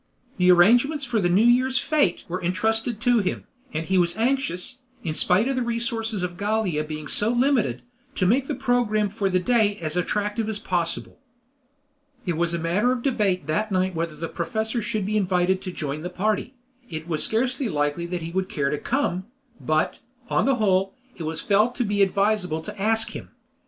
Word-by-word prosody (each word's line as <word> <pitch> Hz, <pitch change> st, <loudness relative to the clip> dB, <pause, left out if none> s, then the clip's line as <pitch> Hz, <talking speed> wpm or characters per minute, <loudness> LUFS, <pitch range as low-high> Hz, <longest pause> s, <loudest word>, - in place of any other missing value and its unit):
The 180 Hz, -1 st, +5 dB
arrangements 245 Hz, -, +4 dB
for 240 Hz, -4 st, 0 dB
the 175 Hz, -3 st, +1 dB
New 195 Hz, +6 st, +4 dB
Year 250 Hz, +2 st, +4 dB
fete 260 Hz, -, +1 dB
were 180 Hz, +2 st, -4 dB
entrusted 220 Hz, +5 st, +1 dB
to 245 Hz, -1 st, +4 dB
him, 195 Hz, -, -2 dB, 0.3 s
and 160 Hz, -6 st, -3 dB
he 190 Hz, +1 st, +2 dB
was 170 Hz, +1 st, +1 dB
anxious, 255 Hz, -1 st, -1 dB, 0.2 s
in 160 Hz, -, -2 dB
spite 185 Hz, +8 st, +3 dB
of 270 Hz, -, 0 dB
the 255 Hz, -, 0 dB
resources 230 Hz, -3 st, -1 dB
of 175 Hz, -1 st, -4 dB
Gallia 205 Hz, -7 st, 0 dB
being 155 Hz, -1 st, -6 dB
so 210 Hz, +8 st, +3 dB
limited, 240 Hz, -, +1 dB, 0.3 s
to 185 Hz, -, +1 dB
make 255 Hz, +8 st, +2 dB
the -, -, -2 dB
program 240 Hz, -5 st, +1 dB
for 200 Hz, -1 st, -1 dB
the 185 Hz, -, +2 dB
great 180 Hz, -, -3 dB
day 220 Hz, -4 st, +3 dB
as 155 Hz, -3 st, -4 dB
attractive 210 Hz, +4 st, -1 dB
as 220 Hz, -, -2 dB
possible. 175 Hz, -4 st, -2 dB, 1.1 s
It 175 Hz, -3 st, -1 dB
was 170 Hz, +1 st, 0 dB
a 170 Hz, -, -1 dB
matter 175 Hz, +9 st, +1 dB
of 250 Hz, -2 st, -2 dB
debate 205 Hz, -, 0 dB
that 205 Hz, +8 st, -1 dB
night 185 Hz, 0 st, +1 dB
whether 165 Hz, -1 st, -3 dB
the 165 Hz, -, -4 dB
professor 220 Hz, +9 st, -2 dB
should 215 Hz, -2 st, -2 dB
be 215 Hz, +2 st, 0 dB
invited 185 Hz, -1 st, +1 dB
to 185 Hz, -, -5 dB
join 150 Hz, -3 st, -4 dB
the 180 Hz, -, -4 dB
party; 215 Hz, +7 st, -1 dB, 0.3 s
it 155 Hz, 0 st, -6 dB
was 155 Hz, -3 st, +1 dB
scarcely 250 Hz, +3 st, 0 dB
likely 150 Hz, +1 st, -1 dB
that 175 Hz, -1 st, -4 dB
he 165 Hz, -, -5 dB
would 190 Hz, +1 st, -2 dB
care 140 Hz, -2 st, -1 dB
to 150 Hz, -, -2 dB
come, 210 Hz, -8 st, -1 dB, 0.3 s
but, 155 Hz, 0 st, 0 dB, 0.3 s
on -, -, +2 dB
the 275 Hz, -, +3 dB
whole, 195 Hz, -3 st, +1 dB, 0.2 s
it 170 Hz, -, -7 dB
was 160 Hz, +1 st, -3 dB
felt 215 Hz, +4 st, +2 dB
to 250 Hz, -, 0 dB
be 205 Hz, -1 st, 0 dB
advisable 195 Hz, -4 st, +1 dB
to 210 Hz, +2 st, -8 dB
ask 225 Hz, +2 st, +2 dB
him. -, -, -8 dB
200 Hz, 200 wpm, -24 LUFS, 175-230 Hz, 1.1 s, The